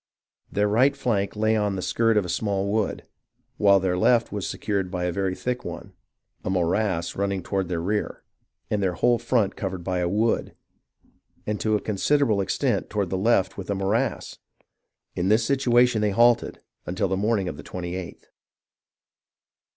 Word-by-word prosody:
Their 105 0 +1
right 130 +7 +3
flank 105 -8 -1
lay 110 +1 +2
on 105 -2 0
the 95 - -4
skirt 115 -1 +2
of 100 - +2
a - - -5
small 100 +1 -1
wood, 110 -1 -1 0.5
while 100 -1 +5
their 90 -1 0
left 115 +6 +3
was 100 -2 -3
secured 100 -3 -2
by 90 -1 -3
a 90 - 0
very 95 +1 -1
thick 125 +3 -3
one; 85 -1 -8 0.5
a - - -3
morass 90 -1 0
running 100 -2 -1
toward 95 -2 -2
their 85 -2 -1
rear, 105 +3 -2 0.5
and 105 - +1
their 90 -2 0
whole 120 +3 +2
front 120 -4 +1
covered 95 -3 -4
by 90 0 -1
a 90 -1 0
wood, 110 +4 0 0.9
and 105 0 -2
to 110 -1 +2
a - - +1
considerable 110 +1 +1
extent 95 - -1
toward 100 -4 -2
the - - 0
left 95 -1 +1
with 95 - -7
a 100 - 0
morass. 95 +4 -1 0.8
In 90 - -1
this 110 +2 +3
situation 125 -3 +3
they 105 - +2
halted, 120 +4 +3 0.3
until 95 +2 -1
the 95 - -1
morning 100 -1 0
of 80 - -5
the 70 - -9
28th. 90 +1 -6
100 Hz, 175 wpm, -25 LUFS, 95-110 Hz, 0.9 s, while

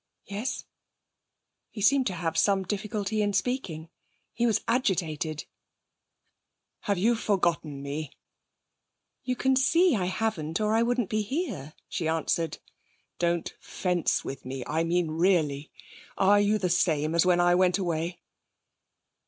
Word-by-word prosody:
'Yes.' 205 +6 -4 1.0
He - - -9
seemed 265 +5 +4
to 185 - -2
have 165 -1 -2
some 195 +4 +3
difficulty 210 +2 -2
in 205 -1 0
speaking. 180 -11 -2 0.4
He 240 0 +1
was 225 - +2
agitated. 165 - 0 1.3
'Have 200 -2 -1
you 220 +7 +3
forgotten 170 -10 0
me?' 145 +1 -4 1.1
'You 255 - -1
can 265 +1 +2
see 330 +4 +4
I 185 -4 0
haven't, 180 -5 -2
or 215 0 +1
I 225 - +3
wouldn't 240 -2 0
be 215 0 +1
here,' 210 - -4
she 170 -4 -3
answered. 165 0 0 0.6
'Don't 170 -1 0
fence 180 -3 -1
with 135 - -6
me. 130 0 -5
I 160 +2 0
mean, 170 -1 0
really. 155 -4 +1 0.5
Are 200 +2 +5
you 205 +1 +2
the 185 -4 -1
same 155 -3 +1
as 170 - +4
when 180 -1 +3
I 175 0 +4
went 180 0 +3
away?' 175 -2 -2
180 Hz, 135 wpm, -27 LUFS, 160-215 Hz, 1.3 s, Are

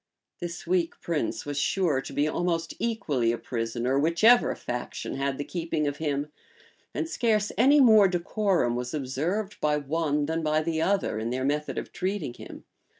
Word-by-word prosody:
This 175 0 -6
weak 175 -1 0
prince 165 -3 -2
was 145 -1 -2
sure 155 -4 +1
to - - -9
be 145 +1 +1
almost 165 0 -1
equally 150 - 0
a 120 - -2
prisoner 120 +3 -1
whichever 170 +11 +4
faction 125 0 -5
had 135 0 -1
the 145 - -3
keeping 165 -2 -2
of 145 0 -2
him; 145 -1 -2 0.6
and - - -2
scarce 220 -8 +1
any 275 +5 +5
more 220 -6 +7
decorum 180 - 0
was 125 +3 -3
observed 160 +10 -2
by 150 0 +2
one 150 0 0
than 160 +2 -1
by 155 0 +1
the 160 0 -1
other, 195 - +1
in 110 +1 -2
their 130 +2 -2
method 150 +2 -1
of - - -5
treating 190 -8 -2
him. - - -11
155 Hz, 170 wpm, -27 LUFS, 140-185 Hz, 0.6 s, more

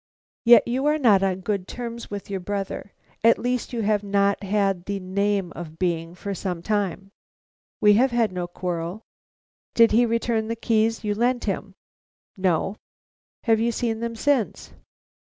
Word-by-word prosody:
"Yet 235 0 +7
you 260 +4 0
are 300 +1 +3
not 220 -9 +4
on 190 -1 0
good 195 -1 -2
terms 235 -1 -6
with 205 -1 -6
your 195 -1 -3
brother; 200 +1 -4 0.3
at 230 +1 +6
least 245 0 -2
you 235 -2 -2
have 205 0 +2
not 200 0 +1
had 195 -3 0
the 200 -1 -3
name 195 0 -1
of 160 -2 -8
being, 170 -1 -1
for 200 +2 -5
some 180 -2 -4
time?" 195 -2 -2 0.7
"We 210 -1 +6
have 265 - +4
had 235 -3 +1
no 180 -1 -3
quarrel." 175 +2 -4 0.7
"Did 230 -1 +6
he 235 +2 +4
return 230 -1 0
the 230 - -2
keys 225 0 +1
you 210 -1 0
lent 240 +3 +1
him?" 195 -1 -3 0.6
"No." 190 +1 0 0.7
"Have 225 -2 +3
you 235 +1 +1
seen 225 -1 -2
them 235 0 -3
since?" 265 -2 0
205 Hz, 165 wpm, -24 LUFS, 190-230 Hz, 0.7 s, Yet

